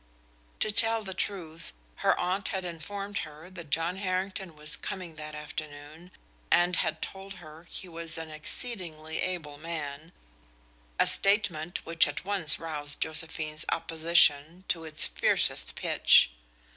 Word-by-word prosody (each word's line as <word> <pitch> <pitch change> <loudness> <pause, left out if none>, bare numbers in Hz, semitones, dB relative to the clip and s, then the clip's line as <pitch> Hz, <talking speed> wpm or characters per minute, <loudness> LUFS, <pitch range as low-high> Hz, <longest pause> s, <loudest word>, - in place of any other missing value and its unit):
To 215 - +3
tell 225 +1 +3
the 190 -2 -5
truth, 170 -5 -4 0.2
her - - +2
aunt 185 +3 -1
had 190 -1 -2
informed 195 +4 -5
her 155 +4 -9
that 170 -5 -9
John 165 +5 +1
Harrington 185 -2 -3
was 150 0 +3
coming 180 -4 -6
that 150 0 -7
afternoon, 150 +2 -8 0.4
and 175 +1 +4
had 160 0 0
told 195 +1 -7
her 160 -1 -13
he 185 - -6
was 165 -1 -2
an 160 -1 -6
exceedingly 160 -1 -5
able 160 -6 -3
man, 155 -1 -6 0.9
a - - +6
statement 195 -5 +1
which 165 0 +4
at 145 +4 -5
once 190 -6 +2
roused 150 -3 -4
Josephine's 155 -1 0
opposition 165 0 +3
to 165 -2 0
its 155 0 +6
fiercest - - +2
pitch. - - +5
165 Hz, 135 wpm, -29 LUFS, 155-185 Hz, 0.9 s, a